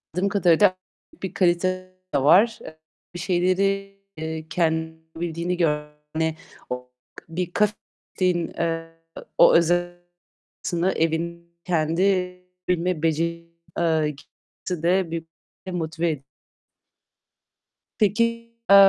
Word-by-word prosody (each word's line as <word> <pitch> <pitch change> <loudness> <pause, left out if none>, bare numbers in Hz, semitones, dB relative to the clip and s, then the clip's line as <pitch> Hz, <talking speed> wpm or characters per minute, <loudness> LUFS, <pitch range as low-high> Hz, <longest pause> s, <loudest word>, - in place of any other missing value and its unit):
Dım 195 +2 +1
kadarıyla 185 -1 +4 0.5
bir 190 - -3
kalite 175 -1 +3 0.5
de 140 - +3
var. 210 +10 +6
Eee, 160 0 -11 0.3
bir 175 - -6
şeyleri, 195 +2 +1 0.2
eee, 160 0 -4
kendi 160 -1 0 0.2
bil 170 +1 -2
gör 150 -3 0 0.8
o 125 0 -5 0.4
bir 175 +1 -3
kah 210 0 +4 0.5
eee, 165 -2 0 0.4
o - - +8
öze 175 +1 +2 0.6
aslında 175 +2 +1
evin 170 +1 -2
kendi 165 0 +1 0.7
bilme 180 -2 0
beceri 170 +1 0 0.3
eee, 160 -3 +2 0.5
d 180 0 +1
büyük 165 -1 -4 0.5
motive 165 0 -1
ediyo 140 -3 -6 1.8
Peki, 210 +1 +4 0.5
eee, 200 - +9
170 Hz, 100 wpm, -24 LUFS, 160-180 Hz, 1.8 s, eee